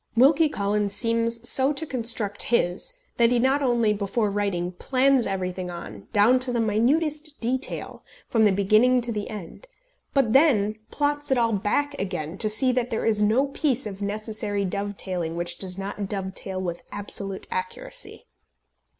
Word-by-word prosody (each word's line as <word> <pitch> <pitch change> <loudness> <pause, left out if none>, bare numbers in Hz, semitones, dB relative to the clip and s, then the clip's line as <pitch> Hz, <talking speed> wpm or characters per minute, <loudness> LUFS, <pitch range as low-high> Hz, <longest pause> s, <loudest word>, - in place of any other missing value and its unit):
Wilkie 300 +5 +5
Collins 205 -3 0
seems 230 +1 +1
so 265 +2 +5
to 295 +3 -4
construct 230 -6 -1
his 235 - 0 0.2
that 235 -1 +4
he 245 - +3
not 265 +4 +2
only, 240 -5 +2
before 205 +1 -1
writing, 195 -4 -1
plans 260 +6 +2
everything 185 -2 -3
on, 110 - -8
down 230 +5 +4
to 255 0 0
the 240 - 0
minutest 295 +8 0
detail, 255 +3 -3 0.2
from 225 -2 +2
the 205 - +5
beginning 215 +6 +3
to 240 0 -2
the 210 -2 -4
end; 210 - -9 0.5
but 250 -5 +3
then 220 -8 +3
plots 290 0 -1
it 265 - +2
all 230 -1 +2
back 210 +9 0
again, 175 -4 -4
to 215 - 0
see 255 +5 +3
that 250 -1 -1
there 225 - -2
is 215 -2 +2
no 220 +6 +3
piece 270 -3 -1
of 200 -1 -7
necessary 210 0 -2
dove 200 +2 -3
tailing 175 -3 -1
which 175 0 -1
does 185 -1 -1
not 200 0 -5
dove 190 -2 -3
tail 190 0 -2
with 175 -2 -4
absolute 200 -1 -5
accuracy. 465 +2 -5
215 Hz, 165 wpm, -25 LUFS, 200-255 Hz, 0.5 s, Wilkie